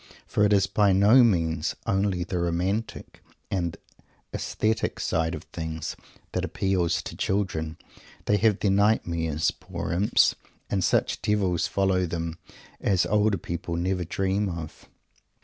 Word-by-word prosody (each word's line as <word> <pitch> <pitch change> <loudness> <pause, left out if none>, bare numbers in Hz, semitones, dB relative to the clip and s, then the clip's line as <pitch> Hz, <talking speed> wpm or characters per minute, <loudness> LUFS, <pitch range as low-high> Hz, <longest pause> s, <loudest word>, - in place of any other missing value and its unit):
For 105 - +1
it 105 - +4
is 100 -2 +4
by 100 0 +3
no 105 +7 +6
means 80 -7 +1
only 95 -2 +1
the 90 +1 -3
"romantic" 90 +6 -2 0.3
and 85 -4 -1 0.6
"aesthetic" 110 +1 -1
side 80 +1 0
of - - -8
things 80 -2 -4 0.4
that - - -2
appeals 90 -3 0
to - - -7
children. 80 -5 -1 0.5
They 105 - +3
have 105 -1 +2
their 100 - +2
nightmares, 85 -6 +1
poor - - -6
imps, 95 +5 +3 0.4
and 95 -2 +1
such - - +1
devils 95 -5 +1
follow 95 -2 +1
them 85 0 -4 0.4
as 95 -3 +2
older 105 +2 +2
people 85 0 -4
never 90 +1 -1
dream 95 +4 -1
of. 85 -3 -7
95 Hz, 135 wpm, -26 LUFS, 85-100 Hz, 0.6 s, no